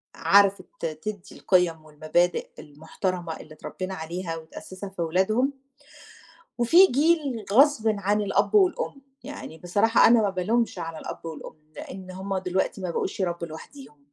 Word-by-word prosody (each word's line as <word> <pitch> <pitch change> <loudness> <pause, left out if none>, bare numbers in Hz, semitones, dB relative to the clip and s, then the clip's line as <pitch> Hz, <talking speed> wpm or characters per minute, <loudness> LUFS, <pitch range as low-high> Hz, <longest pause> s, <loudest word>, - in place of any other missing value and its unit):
عرفت 200 +4 +4 0.2
تدِّي 175 +6 -5
القِيَم 170 -4 +1
والمبادئ 155 +3 0
المُحترمة 160 +3 -5
اللي 155 - -12
اترَبِّينا 185 +4 -6
عليها 165 +1 -5
وتأسِّسها 185 +4 -9
في 190 -3 -7
ولادهم، 215 - +1 1.0
وفي 335 +11 +6
جيل 285 - +1
غصبٍ 270 -3 +5
عن 205 +2 +1
الأب 205 - +1
والأم، 385 - +2 0.2
يعني 255 - -8
بصراحة 205 +7 +3
أنا 230 -1 +5
ما 205 - +1
بالومش 195 +2 0
على 165 -1 -6
الأب - - -8
والأم، 155 -1 -10
لإن 185 -1 -9
هُم 190 +1 -4
دلوقتي 190 +1 -2
ما 180 -2 -3
بقُوش 190 - -3
يربوا 170 -2 -2
لوحديهم. 160 - -12
185 Hz, 135 wpm, -25 LUFS, 165-225 Hz, 1.0 s, وفي